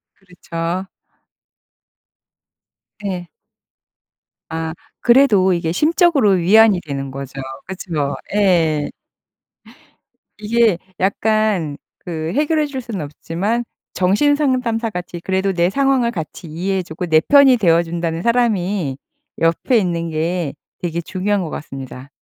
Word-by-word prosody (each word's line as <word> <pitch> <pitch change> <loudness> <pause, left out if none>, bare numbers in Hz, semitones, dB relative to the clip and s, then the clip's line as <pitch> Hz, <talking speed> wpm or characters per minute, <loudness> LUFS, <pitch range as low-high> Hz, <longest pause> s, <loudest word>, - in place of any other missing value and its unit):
그렇죠. 180 -1 -5 2.1
네. 180 -3 -4 1.2
아. 160 0 -3 0.3
그래도 235 -7 +5
이게 170 -2 -1
심적으로 305 - +3
위안이 195 +2 +5
되는 140 -1 -4
거죠. 135 0 -7 0.3
그쵸. 165 -6 -3 0.2
예. 170 -7 +2 1.5
이게 215 -2 +2 0.2
약간 200 -5 +1 0.2
그 160 -1 -4
해결해 305 +2 +1
줄 275 -2 -5
수는 230 -6 -5
없지만 180 +10 -2 0.3
정신 210 +11 +2
상담사같이 225 - -1
그래도 190 +2 0
내 175 -1 +2
상황을 270 0 +2
같이 165 +1 -6
이해해 185 +4 -2
주고 175 +1 -6
내 160 -2 +4
편이 280 - +6
되어 170 -6 +3
준다는 165 0 -3
사람이 205 - +1 0.4
옆에 165 +10 +2
있는 170 -4 -1
게 160 -1 -2 0.3
되게 170 -1 -2
중요한 190 +3 -1
것 165 - -5
같습니다. 135 -2 -8
185 Hz, 230 characters per minute, -19 LUFS, 165-225 Hz, 2.1 s, 편이